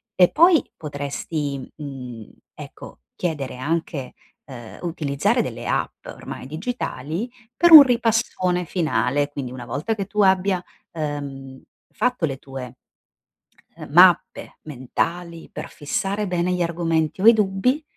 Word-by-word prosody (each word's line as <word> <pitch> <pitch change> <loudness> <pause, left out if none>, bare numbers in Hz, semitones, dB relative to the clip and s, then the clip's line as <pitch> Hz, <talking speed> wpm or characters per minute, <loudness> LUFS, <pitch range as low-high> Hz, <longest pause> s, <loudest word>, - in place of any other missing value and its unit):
e 180 -1 +6
poi 340 0 +5
potresti, 145 -1 -4
mhmm, 125 -6 -8 0.3
ecco, - - -11 0.2
chiedere 145 -8 -3
anche 145 0 -3 0.3
uhm, 120 -5 -10
o 175 - -3
utilizzare 145 -4 0
delle - - -6
app, - - -2
ormai - - -8
digitali 165 - -4 0.3
per 345 -1 +4
un 310 - +14
ripassone 225 -8 +1
finale. 145 - 0
Quindi 140 -4 -6
una 125 -2 -8
volta 150 - -2
che 200 -2 -3
tu 210 +2 -1
abbia, 190 -1 +3 0.3
uhm, 140 -4 -6 0.3
fatto 250 -8 0
le 135 -2 -4
tue, 130 -3 -8 1.0
ehm, - - -9
mappe - - +4
mentali, 165 +5 -4
per - - -7
fissare 195 +7 -2
bene 180 -1 0
gli 180 -1 0
argomenti 165 -1 -1
o - - +3
i - - +10
dubbi, 215 +7 +1
160 Hz, 130 wpm, -22 LUFS, 140-190 Hz, 1.0 s, un